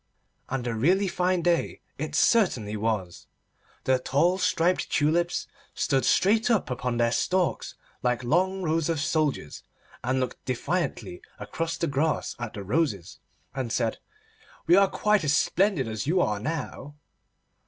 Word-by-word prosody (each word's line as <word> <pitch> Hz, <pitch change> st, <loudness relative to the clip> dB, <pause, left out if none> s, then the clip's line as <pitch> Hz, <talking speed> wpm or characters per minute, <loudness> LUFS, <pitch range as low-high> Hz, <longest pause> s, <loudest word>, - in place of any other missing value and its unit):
And 130 Hz, -2 st, -3 dB
a 120 Hz, -, -1 dB
really 180 Hz, -, +2 dB
fine 180 Hz, -1 st, 0 dB
day 175 Hz, -1 st, +1 dB, 0.2 s
it 155 Hz, +1 st, -4 dB
certainly 125 Hz, -, +2 dB
was. 105 Hz, -5 st, -3 dB, 0.6 s
The 130 Hz, -1 st, +2 dB
tall 165 Hz, +9 st, +1 dB
striped 180 Hz, 0 st, +1 dB
tulips 170 Hz, +4 st, +1 dB, 0.3 s
stood 135 Hz, -2 st, +1 dB
straight 220 Hz, +5 st, +3 dB
up 220 Hz, -, +1 dB
upon 125 Hz, -1 st, -2 dB
their 115 Hz, 0 st, +2 dB
stalks, 180 Hz, +9 st, 0 dB, 0.3 s
like 125 Hz, 0 st, 0 dB
long 185 Hz, +8 st, +1 dB
rows 160 Hz, -1 st, 0 dB
of 165 Hz, -3 st, 0 dB
soldiers, 150 Hz, -, -1 dB, 0.4 s
and 130 Hz, +1 st, 0 dB
looked 130 Hz, -1 st, -4 dB
defiantly 130 Hz, -, -3 dB, 0.2 s
across 160 Hz, +11 st, -4 dB
the -, -, 0 dB
grass 150 Hz, +1 st, -1 dB
at 120 Hz, -3 st, -5 dB
the 100 Hz, -, -6 dB
roses, 105 Hz, -, -1 dB, 0.3 s
and 130 Hz, -4 st, -3 dB
said: 115 Hz, -1 st, -1 dB, 0.7 s
'We 170 Hz, -, +5 dB
are 195 Hz, -1 st, +5 dB
quite 210 Hz, -3 st, +1 dB
as 145 Hz, -1 st, +2 dB
splendid 190 Hz, -, +1 dB
as 110 Hz, +2 st, -4 dB
you 180 Hz, +4 st, +2 dB
are 105 Hz, -11 st, +1 dB
now. 145 Hz, +2 st, -5 dB
150 Hz, 145 wpm, -26 LUFS, 120-175 Hz, 0.7 s, We